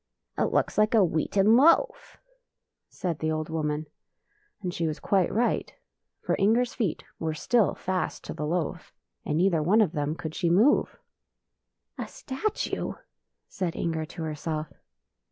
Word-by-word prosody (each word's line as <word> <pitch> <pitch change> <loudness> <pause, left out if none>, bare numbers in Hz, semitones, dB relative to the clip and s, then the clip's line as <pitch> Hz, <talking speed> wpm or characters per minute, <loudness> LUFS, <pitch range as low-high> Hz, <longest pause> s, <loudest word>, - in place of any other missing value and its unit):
" - - -57
" - - -44
It - - +1
looks - - +1
like 215 +2 +3
a 210 -4 +6
wheaten 195 +6 +3
loaf," 335 - +3 0.7
said 170 -4 -3
the 160 0 0
old 155 0 -2
woman, 155 -1 -1 0.8
and 180 -1 -2
she 165 -2 -1
was 155 - -3
quite 190 -3 +1
right; 240 +2 0 0.5
for - - 0
Inger's 230 +5 +3
feet 200 -9 -2 0.2
were 160 -1 -2
still 230 +5 +2
fast 185 0 -3
to - - -6
the 150 - -4
loaf, 170 -1 -3 0.3
and 150 - 0
neither 175 -2 +3
one 190 +9 +3
of 210 -8 +3
them 150 -1 -2
could 160 -2 -6
she 170 0 0
move. 215 - +3 1.0
"A - - -3
statue!" 275 +11 -3 0.5
said 180 -3 -3
Inger 160 -1 -2
to 165 +1 -7
herself. 155 0 -4
175 Hz, 155 wpm, -27 LUFS, 155-215 Hz, 1.0 s, a